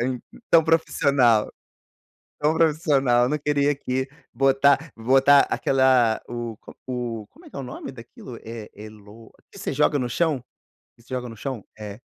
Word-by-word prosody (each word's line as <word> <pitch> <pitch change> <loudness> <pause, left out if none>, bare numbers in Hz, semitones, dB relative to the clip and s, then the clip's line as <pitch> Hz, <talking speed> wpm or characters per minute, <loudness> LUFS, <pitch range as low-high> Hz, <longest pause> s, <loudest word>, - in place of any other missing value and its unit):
Em 125 0 -2 0.3
tão 165 -2 +6
profissional. 140 -8 +2 0.9
Tão 150 +2 +2
profissional, 145 -6 +2
eu 125 - +1
não 150 - 0
queria 145 0 +1
aqui 130 -2 -3 0.3
botar 135 +3 +2
botar 135 +4 +5
aquela 130 -4 +2
o 120 -2 -6
co - - -14
o 120 -4 -5
como 335 +2 -19
é - - -13
que - - -16
é - - -5
o - - -5
nome 125 +1 -8
daquilo? 120 -1 -11
É 115 -1 -8
é 105 +1 -10
"lo" 105 +1 -16 0.2
que - - -14
você - - -3
joga 145 - +2
no 125 -3 -2
chão? 145 -2 0 0.6
Você 115 - -23
joga 125 -1 -4
no 115 - -10
chão? 125 -2 -5 0.2
É. 105 +1 -8
130 Hz, 175 wpm, -23 LUFS, 115-140 Hz, 0.9 s, tão